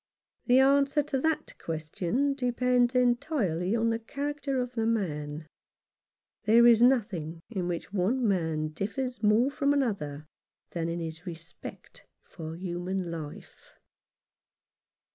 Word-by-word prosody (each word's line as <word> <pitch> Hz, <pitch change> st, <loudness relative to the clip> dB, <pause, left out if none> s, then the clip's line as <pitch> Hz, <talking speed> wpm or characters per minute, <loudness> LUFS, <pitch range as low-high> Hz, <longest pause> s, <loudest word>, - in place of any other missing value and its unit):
The 250 Hz, 0 st, +6 dB
answer 280 Hz, +2 st, +4 dB
to 270 Hz, -2 st, -2 dB
that 320 Hz, 0 st, -1 dB
question 170 Hz, -, -1 dB
depends 250 Hz, -1 st, +1 dB
entirely 240 Hz, -, +1 dB
on 230 Hz, 0 st, +2 dB
the 225 Hz, -, -1 dB
character 280 Hz, +3 st, -3 dB
of 250 Hz, 0 st, -3 dB
the 225 Hz, -2 st, 0 dB
man. 155 Hz, -8 st, -2 dB, 1.0 s
There 230 Hz, +2 st, +6 dB
is 235 Hz, -1 st, +7 dB
nothing 195 Hz, -11 st, +2 dB
in 185 Hz, -5 st, -2 dB
which 175 Hz, +2 st, -4 dB
one 225 Hz, +6 st, +1 dB
man 160 Hz, -5 st, 0 dB
differs 225 Hz, -, -4 dB
more 220 Hz, +5 st, +4 dB
from 280 Hz, 0 st, +1 dB
another 175 Hz, -, -1 dB, 0.5 s
than 170 Hz, -1 st, -2 dB
in 170 Hz, +1 st, -2 dB
his 165 Hz, +2 st, -6 dB
respect 165 Hz, -1 st, -10 dB, 0.2 s
for 160 Hz, 0 st, -8 dB
human 180 Hz, 0 st, -3 dB
life. 155 Hz, -3 st, -9 dB
215 Hz, 125 wpm, -29 LUFS, 170-250 Hz, 1.0 s, is